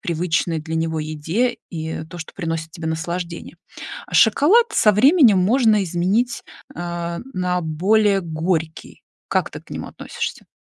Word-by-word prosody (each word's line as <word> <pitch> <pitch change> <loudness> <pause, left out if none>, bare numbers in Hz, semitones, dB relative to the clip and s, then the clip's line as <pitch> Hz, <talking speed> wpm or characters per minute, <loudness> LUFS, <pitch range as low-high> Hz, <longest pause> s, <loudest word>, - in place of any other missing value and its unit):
привычной 165 -1 -1
для 160 +1 -4
него 160 -1 -1
еде 160 +11 -1
и 160 -2 -5
то, 175 - -9
что 160 - -8
приносит 165 -3 -4
тебе 160 -1 -7
наслаждение. 170 +2 -4 0.6
Шоколад 320 - +5
со 210 - +4
временем 250 - +5
можно 215 +1 +3
изменить, 190 +8 0 0.3
э, 170 0 -4 0.2
на 180 -1 0
более 195 +5 +2
горький. 160 -1 -3 0.3
Как - - 0
ты - - -8
к - - -24
нему - - -5
относишься? - - -6
175 Hz, 135 wpm, -21 LUFS, 160-210 Hz, 0.6 s, Шоколад